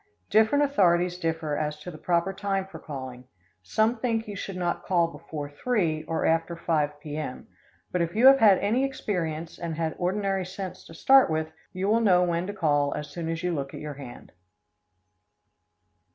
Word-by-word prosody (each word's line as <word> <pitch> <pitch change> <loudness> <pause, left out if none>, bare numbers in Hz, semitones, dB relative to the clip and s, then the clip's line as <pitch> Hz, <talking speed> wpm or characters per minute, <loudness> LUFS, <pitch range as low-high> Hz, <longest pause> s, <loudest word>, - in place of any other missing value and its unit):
Different 220 +7 +4
authorities 180 -9 +2
differ 160 -3 -1
as 150 0 -2
to 180 - -7
the 155 - -10
proper 175 +3 +1
time 195 -1 -1
for 185 -4 -11
calling. 130 -4 -8 0.4
Some 220 - +1
think 225 -2 -1
you 205 - -6
should 195 0 -5
not 175 -1 -2
call 170 -3 +2
before 150 -3 -7
3 160 -1 -1
or 165 - -1
after 165 +1 +1
5 150 -3 -1
P.M., 150 -3 -6 0.5
but 180 - 0
if 170 +3 -2
you 230 +4 +4
have 270 0 +9
had 205 -5 +7
any 230 +6 +1
experience 170 -11 -3
and 170 -2 -4
had 160 -1 -1
ordinary 195 +1 0
sense 190 0 -7
to 165 - -12
start 270 +7 +6
with, 160 0 -1 0.2
you 190 +1 -2
will 225 +3 +3
know 180 -5 +5
when 175 0 0
to 205 - -4
call 145 -6 +1
as 150 -1 -6
soon 165 +1 -4
as 165 +1 -3
you 180 -1 0
look 140 -3 -4
at - - -7
your 150 -1 -6
hand. 135 -3 -11
170 Hz, 185 wpm, -26 LUFS, 155-195 Hz, 0.5 s, have